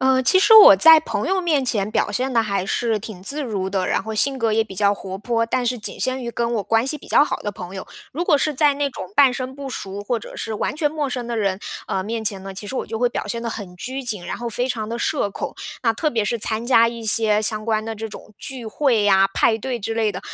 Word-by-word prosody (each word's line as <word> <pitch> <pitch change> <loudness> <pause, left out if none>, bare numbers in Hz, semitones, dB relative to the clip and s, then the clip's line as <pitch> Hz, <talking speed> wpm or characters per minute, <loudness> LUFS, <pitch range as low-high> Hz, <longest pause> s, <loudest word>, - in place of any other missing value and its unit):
呃， 260 0 +3
其 375 +9 +5
实 400 - +4
我 415 - +10
在 320 +10 +8
朋 225 -6 -3
友 380 0 +1
面 310 -6 +1
前， 210 -5 0
表 215 - 0
现 255 +6 -1
得 230 - +3
还 200 -3 -2
是 225 +1 0
挺 205 -3 -9
自 290 +9 -3
如 200 -7 -3
的， 190 -2 -1
然 - - 0
后 220 - -6
性 270 +5 +1
格 230 -4 0
也 225 +1 +3
比 220 -3 -10
较 200 +1 +3
活 190 -2 -6
泼， 230 +3 -1
但 245 +2 -1
是 245 +1 0
仅 210 - -5
限 260 0 -1
于 235 - -4
跟 235 0 -2
我 215 - -1
关 225 +4 +1
系 300 +2 -2
比 - - -15
较 - - +5
好 - - -2
的 205 - -4
朋 180 -1 -9
友。 190 - -7 0.3
如 325 - -2
果 295 - +4
是 305 +2 0
在 290 +1 +3
那 285 0 -1
种 185 -7 -8
半 275 -3 +6
生 255 +1 -5
不 275 -1 -7
熟， 200 -4 -6
或 235 +3 -1
者 - - -11
是 225 - -4
完 240 - -2
全 300 -1 +1
陌 300 -2 -2
生 250 -2 -4
的 235 -1 -3
人， 195 -3 0 0.3
呃， 190 - -2
面 225 +3 -4
前 200 -3 -2
呢， 195 0 -7
其 195 +2 -8
实 235 - -6
我 - - -2
就 225 - -5
会 245 +1 +2
表 240 - -4
现 230 +3 -4
得 235 - -3
很 200 -5 -7
拘 260 +8 -5
谨， 210 -8 -4
然 - - -4
后 240 0 -5
非 245 +3 -2
常 220 -4 -3
地 235 +1 -4
社 205 - 0
恐。 - - -5 0.3
那 230 -3 +3
特 305 +7 -1
别 230 -4 0
是 235 +3 -1
参 220 +2 -2
加 230 -2 +5
一 230 -1 -7
些， 215 -1 +2
相 215 0 -2
关 215 -1 0
的 225 0 -5
这 220 +1 -5
种 215 - -12
聚 255 -4 -6
会 220 -3 +1
啊， 195 0 +5
派 220 - +3
对 245 +2 -4
之 225 +2 -3
类 220 -2 +1
的， 185 - -6
230 Hz, 305 characters per minute, -21 LUFS, 210-260 Hz, 0.3 s, 我